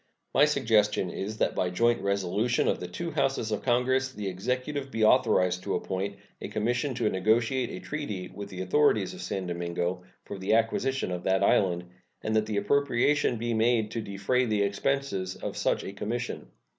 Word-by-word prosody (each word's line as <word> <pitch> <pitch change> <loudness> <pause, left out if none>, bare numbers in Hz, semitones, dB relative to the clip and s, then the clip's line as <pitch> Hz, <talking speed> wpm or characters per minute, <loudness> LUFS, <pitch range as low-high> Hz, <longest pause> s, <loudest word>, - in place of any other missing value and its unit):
My 140 +3 +6
suggestion 110 -10 +2
is 105 +3 -4
that - - +1
by 90 - 0
joint 115 +6 +2
resolution 100 +4 0
of - - +1
the - - -5
two 170 -1 -5
Houses 135 -6 0
of 105 - -1
Congress 130 +1 +1
the 105 -5 -5
Executive 130 +8 -3
be 115 -3 -1
authorized 110 -7 +4
to - - -2
appoint 100 +1 -3 0.3
a - - -4
commission 125 +5 -1
to 110 - 0
negotiate 115 +6 +1
a - - -6
treaty 105 -12 -5
with 100 +1 -8
the 95 -1 -6
authorities 105 0 +2
of - - -9
San 95 -2 -3
Domingo 85 +1 -2 0.2
for 100 - -7
the 95 +3 +2
acquisition 115 +1 0
of 90 -1 -3
that 95 +1 +2
island, 90 -3 +3 0.4
and 110 - -1
that 110 0 +1
an 105 - -1
appropriation 140 +2 +2
be 120 +1 -2
made 110 -1 +2
to 115 - -3
defray 105 +6 0
the 105 -2 +1
expenses 100 -3 -1
of - - -5
such - - 0
a 95 - -6
commission. 120 +5 -4
110 Hz, 180 wpm, -28 LUFS, 95-125 Hz, 0.4 s, My